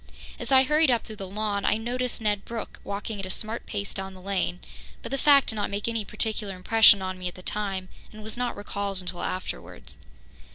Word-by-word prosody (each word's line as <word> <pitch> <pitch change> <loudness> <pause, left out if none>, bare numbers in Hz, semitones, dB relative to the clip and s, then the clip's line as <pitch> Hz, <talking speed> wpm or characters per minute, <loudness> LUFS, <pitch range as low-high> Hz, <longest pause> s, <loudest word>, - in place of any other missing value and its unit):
As - - -3
I 265 0 +8
hurried 300 +2 +4
up 240 -3 +3
through 215 - -9
the 195 - -5
lawn, 205 0 -1
I - - +3
noticed 245 +2 -2
Ned 210 -2 +1
Brooke 230 -1 -6
walking 200 +1 -4
at 195 - -3
a - - -7
smart 220 +4 -2
pace 200 -1 -3
down 190 -1 -5
the - - -11
lane, 185 -2 -1 0.4
but - - -6
the 275 - +1
fact 280 -1 +6
did 220 - 0
not 205 - 0
make 200 +2 -2
any 230 -2 0
particular 210 -2 -2
impression 200 +1 +6
on 185 0 -3
me 180 - -3
at 180 - -5
the 185 - -11
time, 195 -3 -2 0.2
and 215 0 -10
was 220 0 -5
not 245 -2 -2
recalled 200 -1 -3
until 180 -1 -5
afterwards. 185 - -4
205 Hz, 220 wpm, -27 LUFS, 190-225 Hz, 0.4 s, I